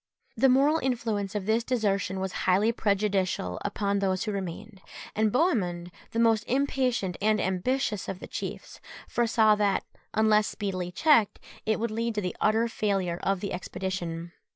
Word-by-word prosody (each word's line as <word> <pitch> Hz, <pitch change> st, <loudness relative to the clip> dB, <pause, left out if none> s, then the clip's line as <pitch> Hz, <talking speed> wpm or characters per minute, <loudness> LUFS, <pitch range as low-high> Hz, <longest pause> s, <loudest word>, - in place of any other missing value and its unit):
The 270 Hz, -, +4 dB
moral 280 Hz, +5 st, +4 dB
influence 225 Hz, -7 st, -2 dB
of 205 Hz, -2 st, -2 dB
this 220 Hz, +2 st, +2 dB
desertion 200 Hz, -6 st, 0 dB
was 190 Hz, 0 st, -2 dB, 0.2 s
highly 200 Hz, +5 st, +4 dB
prejudicial 195 Hz, -, 0 dB
upon 200 Hz, -1 st, -1 dB
those 190 Hz, -1 st, 0 dB
who 215 Hz, -, -2 dB
remained; 195 Hz, +1 st, -6 dB, 0.3 s
and 215 Hz, 0 st, +2 dB
Bohemund, 180 Hz, -, 0 dB, 0.2 s
the -, -, -6 dB
most 225 Hz, -2 st, +3 dB
impatient 255 Hz, -8 st, 0 dB
and 215 Hz, +1 st, +3 dB
ambitious 210 Hz, +3 st, -1 dB
of 195 Hz, -, -4 dB
the -, -, -8 dB
chiefs, -, -, -7 dB, 0.3 s
foresaw 225 Hz, -2 st, +3 dB
that, 205 Hz, -1 st, +1 dB, 0.3 s
unless 215 Hz, -1 st, +4 dB
speedily 185 Hz, -4 st, -3 dB
checked, 230 Hz, -, +3 dB, 0.3 s
it 220 Hz, 0 st, +1 dB
would 230 Hz, 0 st, -1 dB
lead 230 Hz, +1 st, -2 dB
to 210 Hz, -, 0 dB
the 180 Hz, -2 st, -3 dB
utter 220 Hz, +2 st, +3 dB
failure 195 Hz, -6 st, -1 dB
of 195 Hz, -1 st, 0 dB
the 200 Hz, -, -3 dB
expedition. 175 Hz, -2 st, -4 dB
210 Hz, 155 wpm, -27 LUFS, 190-230 Hz, 0.3 s, The